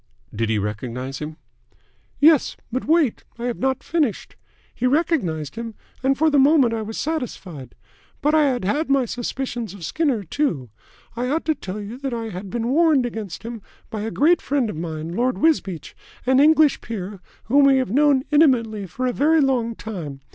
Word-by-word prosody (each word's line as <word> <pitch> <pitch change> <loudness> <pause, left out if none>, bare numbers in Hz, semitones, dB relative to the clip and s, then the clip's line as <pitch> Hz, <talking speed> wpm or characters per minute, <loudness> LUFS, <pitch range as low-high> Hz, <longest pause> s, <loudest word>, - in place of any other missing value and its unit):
"Did 115 +1 -1
he 110 - +1
recognise 120 +6 -4
him?" 155 +1 -6 0.8
"Yes. 305 -1 +4
But 255 +2 -2
wait. 315 -6 +2
I 235 - -7
have 245 -1 -2
not 265 0 0
finished. 300 - -1 0.4
He 250 - 0
recognised 250 - 0
him, 230 -1 -5 0.3
and 270 +1 +2
for 315 +1 +3
the 290 - +4
moment 270 -4 +5
I 225 - -2
was 220 +1 -6
satisfied. 200 - -5 0.4
But 300 +2 +1
I 305 -2 +5
had 250 -7 -1
had 290 - 0
my 275 -2 +3
suspicions 240 -3 -4
of 175 -5 -8
Skinner, 270 - 0
too. 165 - -2 0.4
I 245 +1 -2
ought 310 +5 -1
to 315 - +2
tell 205 -8 -7
you 210 +5 -7
that 270 -3 -3
I 225 -1 -4
had 190 0 -7
been 235 +3 -2
warned 300 -2 +4
against 220 -7 -6
him 230 -1 -6 0.3
by 215 - -4
a 220 - -2
great 315 +9 +3
friend 265 -6 0
of - - -8
mine, 160 -1 -5
Lord 250 +3 +1
Wisbeach, 240 - 0 0.3
an 260 +1 +4
English 310 0 +5
peer 200 -3 -6 0.2
whom 280 +4 +4
we 275 -1 +5
have 255 -6 -1
known 280 0 +4
intimately 230 -9 +3
for 255 +9 -4
a 250 - 0
very 315 +5 +3
long 250 -5 +1
time. 165 -12 -7
245 Hz, 185 wpm, -22 LUFS, 200-285 Hz, 0.8 s, moment